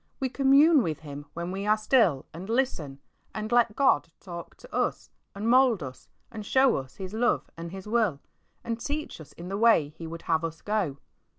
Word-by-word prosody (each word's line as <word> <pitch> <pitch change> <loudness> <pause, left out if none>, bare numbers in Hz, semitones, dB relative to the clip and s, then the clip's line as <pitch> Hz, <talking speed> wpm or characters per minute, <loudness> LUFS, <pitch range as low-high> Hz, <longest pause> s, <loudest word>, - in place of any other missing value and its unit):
We 265 -2 -1
commune 280 +4 +5
with 160 -7 -3
Him 145 -1 -9
when 170 +1 -4
we 195 +2 -4
are 215 +1 +4
still 215 - +3
and 180 +5 -8
listen, 225 - -1 0.4
and 215 +1 -4
let 235 -3 +3
God 215 - +3
talk 170 -2 -9
to - - -11
us, - - -1 0.2
and 205 +3 -3
mould 245 - +4
us, 130 -1 -10 0.2
and 220 -3 -6
show 260 +5 +3
us 130 -1 -7
His 190 0 -7
love 240 +2 0
and 170 +1 -7
His 190 0 -8
will, 215 -10 +1 0.4
and 230 0 -3
teach 290 - -4
us 150 - -13
in 175 - -9
the 195 +1 -3
way 225 -11 +5
He 165 +2 -9
would 165 +1 -8
have 160 -1 +1
us 165 -1 -5
go. 205 -10 -1
200 Hz, 200 wpm, -27 LUFS, 165-235 Hz, 0.4 s, commune